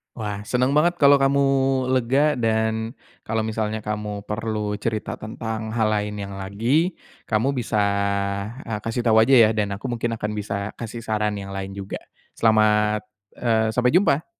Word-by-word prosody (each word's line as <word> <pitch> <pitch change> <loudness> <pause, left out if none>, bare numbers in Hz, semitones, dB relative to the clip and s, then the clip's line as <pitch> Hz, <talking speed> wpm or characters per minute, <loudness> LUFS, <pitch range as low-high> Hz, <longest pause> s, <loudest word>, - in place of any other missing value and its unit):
Wah. 105 -2 -5
Senang 125 +2 +1
banget 155 +5 +3
kalau 140 -4 +6
kamu 140 +1 +3 0.5
lega, 130 +4 +2
dan 110 0 0 0.3
kalau 110 0 0
misalnya 110 0 -2
kamu 105 -1 -4
perlu 105 0 -3
cerita 110 0 -3
tentang 110 0 -5
hal 110 -2 +2
lainnya 105 -1 -2
lagi, 115 - 0 0.3
kamu 110 +5 +1
bisa, 120 -5 -1 0.8
eee, 110 -2 -4
kasih 115 +3 -3
tau 110 -2 +4
aja 115 +5 +5
ya. 115 -4 +7
Dan 105 -2 -1
aku 110 +6 -5
mungkin 120 -1 -2
akan 105 -1 -3
bisa 100 0 -3
kasih 115 0 -6
saran 105 -2 -1
yang 100 -1 -6
lain 95 0 -5
juga. 100 -1 -6 0.4
Selamat 105 -1 +3 0.3
eee, 110 -2 +1
sampai 125 +1 +3
jumpa! 165 -3 +3
110 Hz, 155 wpm, -23 LUFS, 105-120 Hz, 0.8 s, ya